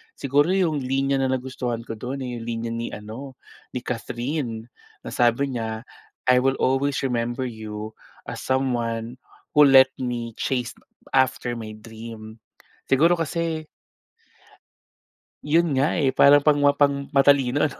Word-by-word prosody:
Siguro 145 +3 +2
yung 170 -6 +1
linya 135 +1 0
na 130 -1 +1
nagustuhan 125 -2 -3
ko 115 - -6
dun 130 +3 -4
eh 125 -1 -4
yung - - -8
linya 115 0 -3
ni 115 0 -3
ano, 115 +6 -9 0.4
ni - - 0
Kathryn 120 0 -3 0.4
na - - -7
sabi 125 +2 +1
niya, 110 0 -4 0.4
"I 125 0 +6
will 135 +1 +2
always 135 +1 +1
remember 120 0 -1
you 110 -1 -7 0.4
as - - -6
someone 120 -3 -1 0.4
who 150 - +8
let 135 -1 +8
me 120 -2 -4
chased 125 -3 -2 0.4
after 130 -2 +1
my 110 -2 -7
dream." 110 0 -11 0.5
Siguro 165 +6 +5
kasi 165 -1 -2 1.8
Yun 160 0 +2
nga 145 +6 +1
eh 135 -3 +2
parang 145 +1 +7
pangma 145 -1 +4
pang-matalino 140 -1 +3
ano - - -11
130 Hz, 135 wpm, -24 LUFS, 115-140 Hz, 1.8 s, who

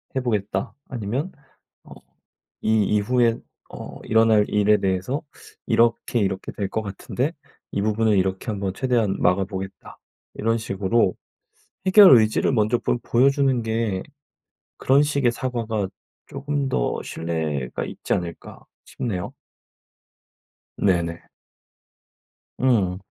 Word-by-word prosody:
해 130 - +1
보겠다." 105 -5 -2 0.2
아니면 125 - -3 0.5
어 - - -13 0.7
"이 110 -1 +2
이후에 115 +3 +2 0.3
어 - - -9
일어날 110 -1 +4
일에 105 0 +3
대해서 95 +10 -1 0.4
이렇게, 115 +1 +2
이렇게 95 -2 -2
될 100 -2 -3
것 110 - -2
같은데 120 - -3 0.4
이 100 - -1
부분을 110 0 +2
이렇게 95 0 -1
한번 100 -3 -2
최대한 115 -4 0
막아보겠다." 95 +1 -2 0.4
이런 115 +1 0
식으로 100 -1 0 0.7
'해결 190 - +9
의지를 110 +3 +2
먼저 110 0 +2
좀 - - +1
보여주는 135 0 +2
게 110 -4 -1 0.8
그런 140 +2 +4
식의 140 -5 +1
사과가 115 -6 -2 0.4
쪼금 140 0 -3
더 - - -1
신뢰가 80 -6 -3
있지 - - -4
않을까?' 85 -1 -5 0.2
싶네요. 95 -8 -4 1.4
네네. 85 -3 0 1.4
음. 100 -8 +2
110 Hz, 235 characters per minute, -23 LUFS, 95-125 Hz, 1.4 s, 해결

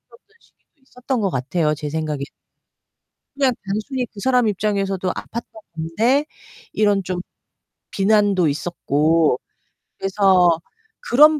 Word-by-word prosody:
던 470 - -18 0.2
시기도 290 - -33
있었던 250 -1 -3
것 195 - +1
같아요, 150 +3 0
제 150 0 -5
생각에. 150 -2 -3 1.1
그냥 275 -2 +2
단순히 230 +6 -2
그 205 - -12
사람 250 -2 +3
입장에서도 195 -2 -1
아팠던 235 0 -6 0.3
건데 220 - +1 0.5
이런 205 -2 +2
좀 180 -1 -3 0.7
비난도 200 -4 +3
있었고. 155 -2 +1 0.6
그래서 190 -4 +4 0.5
그런 300 +5 +6
195 Hz, 250 characters per minute, -21 LUFS, 165-235 Hz, 1.1 s, 그런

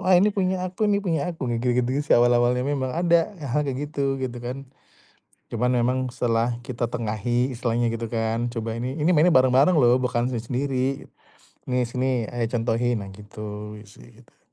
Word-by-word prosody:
Wah, 185 - +2
ini 195 +4 +5
punya 185 -2 0
aku 185 +4 -2
nih 200 -1 +2
punya 165 -5 0
aku, 145 -6 -5
kayak 120 -1 -1 0.2
gitu-gitu 130 +4 0
sih - - +8
awal-awalnya 120 +1 +3
memang 135 -2 -1
ada 170 +2 +2
hal-hal 145 +1 -1
kayak 135 +3 -3
gitu, 140 -2 0
gitu 125 -2 -3
kan. 125 +3 -6 0.9
Cuman 125 +2 0
memang 125 +1 +1
setelah 120 -1 0
kita 120 -1 -3
tengahi 120 +3 -1
istilahnya 120 0 0
gitu 115 -1 -5
kan, 115 +1 -1
"Coba 115 -1 -4
ini, 125 +5 -4
ini 165 +4 +3
mainnya 165 +3 +5
bareng-bareng 130 +6 +5
lho 120 -2 +5
bukan 125 -1 0
sendiri-sendiri. 130 +3 -2 0.6
Nih, 125 -1 +1
sini 125 0 -1
ayah 120 -1 -1
contohin," 115 -1 0
nah 100 - -9
gitu 105 +1 -8
sih - - -17
gitu. - - -30
125 Hz, 175 wpm, -24 LUFS, 115-135 Hz, 0.9 s, sih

